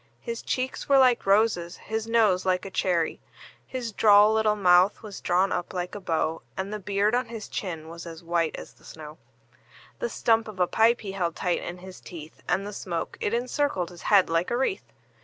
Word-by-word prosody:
His 230 0 -5
cheeks 255 +2 -3
were 275 - +6
like 250 -5 +4
roses, 195 -4 +2
his 220 +1 -4
nose 215 -5 +3
like 185 0 0
a 195 - -7
cherry; 175 -4 0 0.5
His 250 -3 -4
droll 210 0 +6
little 220 -1 +2
mouth 185 0 +4
was 210 -2 -8
drawn 185 +2 +2
up 175 - -3
like 180 0 -3
a 205 - -5
bow, 165 -3 -1 0.2
And 195 +2 -3
the 210 - -4
beard 200 +2 0
on 250 +1 +1
his 225 -2 -7
chin 165 -5 -5
was 170 +1 -9
as 165 0 -9
white 170 -1 0
as - - -10
the - - -26
snow; 155 0 -11 0.8
The 485 - -2
stump 225 - +1
of 210 -3 -9
a 180 - +4
pipe 225 +6 +3
he 200 -3 -5
held 175 -4 -2
tight 180 -1 -1
in 175 - -6
his 185 +1 -11
teeth, 160 -3 -11
And 195 - +1
the 205 - -6
smoke, 170 -4 -4
it - - 0
encircled 240 - -1
his 175 - -12
head 200 -3 +6
like 165 +2 0
a 240 - 0
wreath. 265 +9 -2
195 Hz, 210 wpm, -26 LUFS, 175-225 Hz, 0.8 s, were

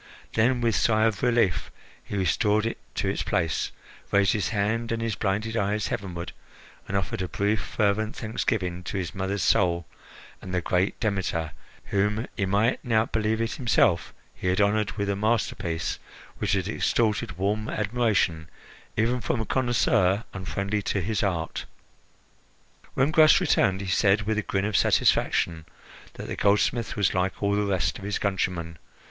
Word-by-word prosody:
Then, 120 +3 +2
with 115 -3 +2
sigh 110 -1 +3
of 110 -3 0
relief, 115 -8 +2 0.3
he 100 - -5
restored 105 +4 +2
it 115 - -3 0.2
to - - -1
its - - -1
place, 80 -2 -1 0.4
raised 100 -1 +4
his 105 - 0
hand 115 +2 -1
and 115 - -1
his 115 -1 -1
blinded 105 +3 -1
eyes 105 -1 0
heavenward, 90 -3 -4 0.6
and 100 - -1
offered 95 -1 -2
a 90 - -2
brief, 100 +2 0
fervent 105 +3 0
thanksgiving 95 -5 -2
to - - -3
his 90 -3 -3
mother's 95 +1 -2
soul 85 -3 +2 0.6
and 95 - -5
the - - +2
great 90 +3 0
Demeter, 95 -7 -1 0.3
whom, 105 +3 0
he 100 -3 -1
might 105 +5 +1
now 110 -3 +2
believe 110 0 -1
it 115 - -1
himself, 110 - +2 0.2
he - - -5
had 90 +2 +2
honoured 105 0 +2
with 100 -1 -2
a 100 - 0
masterpiece 100 -5 -1 0.4
which - - 0
had 95 -2 0
extorted 105 -4 0
warm 105 +3 -1
admiration 105 -8 0 0.5
even 120 +3 +1
from 115 - -1
a 110 - -2
connoisseur 115 -5 +2
unfriendly 100 +2 -2
his 100 +2 -1
art. 85 -5 -2 1.3
When 135 +3 +2
Gras 155 -1 +6
returned, 100 - +2
he 100 - -5
said, 100 +2 +3
with 110 0 0
a - - +1
grin 95 -1 -1
of 105 -1 -2
satisfaction, 80 -3 +2 0.5
that - - -7
the - - -4
goldsmith 105 +3 +1
was 105 -3 +1
like 95 +2 -1
all 100 0 +2
the 105 - +2
rest 95 -2 0
of - - -11
his 100 0 -1
countrymen. 85 -4 -2
100 Hz, 165 wpm, -26 LUFS, 95-110 Hz, 1.3 s, Gras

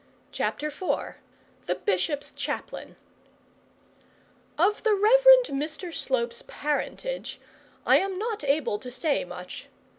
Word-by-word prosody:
CHAPTER 300 - -2
IV 325 +5 -2 0.5
THE - - +1
BISHOP'S 295 -8 -1
CHAPLAIN - - -5 1.6
Of 385 +7 +2
the 440 -3 +3
Rev. 480 +5 +4 0.3
Mr 315 +5 -3
Slope's 235 -5 -1
parentage 400 +12 -3 0.5
I - - +6
am 385 -1 -2
not 435 -3 -3
able 275 -7 +1
to 250 - -8
say 265 +4 0
much. 180 0 -9
305 Hz, 110 wpm, -27 LUFS, 265-410 Hz, 1.6 s, I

